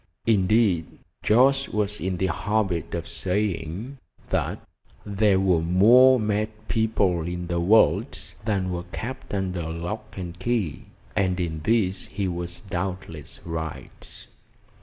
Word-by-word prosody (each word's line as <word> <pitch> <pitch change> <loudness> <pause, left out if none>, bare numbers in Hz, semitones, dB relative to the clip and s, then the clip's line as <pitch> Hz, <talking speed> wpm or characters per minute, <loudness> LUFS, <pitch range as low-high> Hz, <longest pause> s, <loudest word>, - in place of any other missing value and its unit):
Indeed, 100 -5 +2 0.3
Jorce 135 +5 +4
was 105 0 -1
in 95 -1 -2
the 95 - 0
habit 100 -4 -1
of 85 -1 -4
saying 95 - -3 0.3
that - - -2 0.4
"There 100 -1 +2
were 90 -4 +3
more 120 +10 +6
mad 105 0 0 0.2
people 100 -7 +1
in 90 0 -4
the 85 0 -1
world 100 +6 +4 0.3
than 95 -4 0
were 90 0 -4
kept 130 +4 -6
under 90 -4 -2
lock 105 +7 -5
and 90 -1 -6
key," 105 -7 -1 0.3
and 95 -2 +1
in 80 -3 -2
this 95 +1 +1
he 100 -1 -2
was 85 0 -5
doubtless 90 -5 -5
right. 80 -2 -7
95 Hz, 125 wpm, -25 LUFS, 85-110 Hz, 0.4 s, more